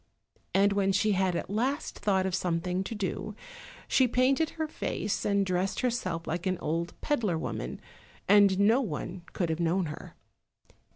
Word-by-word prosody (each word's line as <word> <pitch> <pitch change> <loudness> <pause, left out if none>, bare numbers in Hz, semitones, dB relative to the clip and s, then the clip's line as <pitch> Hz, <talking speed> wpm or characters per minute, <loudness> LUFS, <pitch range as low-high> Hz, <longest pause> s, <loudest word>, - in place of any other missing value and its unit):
And 200 +1 +4
when 195 -1 +2
she 205 +2 +2
had 190 -2 +1
at - - -2
last 255 +9 -2
thought 190 -2 +2
of 190 - -1
something 180 +1 -1
to 225 - -4
do, 205 +1 -3 0.5
she 260 - +4
painted 260 +6 +2
her 315 -1 -1
face, 210 -8 -3
and 200 -1 +2
dressed 185 +1 -1
herself 185 -10 -1
like 175 +3 -2
an 185 -1 0
old 170 +2 -3
peddler 220 - 0
woman, - - -4 0.5
and 200 -1 +6
no 220 +6 +5
one 180 - -4
could 170 -3 -1
have 160 - -2
known 175 +2 +1
her. 150 -1 -8
195 Hz, 165 wpm, -29 LUFS, 180-215 Hz, 0.5 s, and